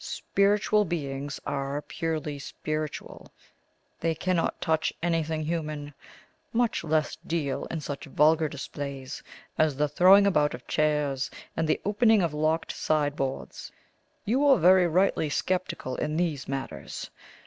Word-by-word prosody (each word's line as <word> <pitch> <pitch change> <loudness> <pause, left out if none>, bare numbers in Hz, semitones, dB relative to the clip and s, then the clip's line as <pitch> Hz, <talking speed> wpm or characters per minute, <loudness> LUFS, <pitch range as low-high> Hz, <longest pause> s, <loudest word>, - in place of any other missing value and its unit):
Spiritual 205 +1 +2
beings 145 -5 -4
are 140 +1 -2
purely 155 -3 -3
spiritual; 155 +2 -5 0.7
they 165 -1 0
cannot 180 0 0
touch 160 -2 +1
anything 160 -2 0
human, 155 -3 -3 0.6
much 235 -4 +1
less 155 -1 0
deal 150 -5 -2
in 165 - -4
such 145 -1 -5
vulgar 155 +2 +3
display 140 -1 -6 0.5
as 155 -3 +3
the 150 +2 +1
throwing 185 +7 +6
about 150 -8 +2
of 125 - -13
chairs, 150 -3 0 0.3
and 160 - 0
the 155 - +1
opening 215 0 +4
of 165 -3 -1
locked 155 +2 0
sideboards. 145 -3 -2 0.5
You 235 +6 +2
were 285 -2 +6
very 180 0 +6
rightly 175 -2 +2
sceptical 180 -5 -2
in 150 +1 -2
these 160 -6 -1
matters. 135 -1 -5
155 Hz, 125 wpm, -27 LUFS, 145-175 Hz, 0.7 s, throwing